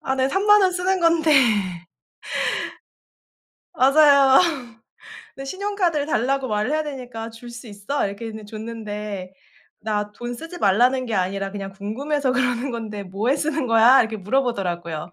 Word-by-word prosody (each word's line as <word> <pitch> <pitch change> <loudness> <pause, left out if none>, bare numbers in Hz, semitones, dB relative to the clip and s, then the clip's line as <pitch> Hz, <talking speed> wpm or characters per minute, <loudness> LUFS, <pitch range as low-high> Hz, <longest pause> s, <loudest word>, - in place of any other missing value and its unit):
아 265 0 -2
네. 260 0 +1
30,000 415 +4 +4
원 370 - +3
쓰는 370 +1 0
건데. 330 -2 +2 2.4
맞아요. 280 -2 +6 1.0
그 270 - -7
신용카드를 370 -3 -1
달라고 270 -1 0
말을 210 +4 -1
해야 310 0 0
되니까 245 -5 -7
"줄 235 +2 -12
수 240 +1 -10
있어?" 205 +6 -3
이렇게 200 +4 -6
했는 220 -1 -8
줬는데 210 -3 -6 0.5
"나 210 -1 -3
돈 240 +3 -6
쓰지 330 +7 -9
말라는 250 - +2
게 225 - -3
아니라 195 +1 -2
그냥 195 -1 -6
궁금해서 260 +8 -2
그러는 250 0 0
건데 220 -4 -5
뭐에 200 +8 -1
쓰는 300 -2 -1
거야?" 230 +3 +6
이렇게 225 -1 -1
물어보더라고요. 180 - -2
240 Hz, 300 characters per minute, -22 LUFS, 210-280 Hz, 2.4 s, 맞아요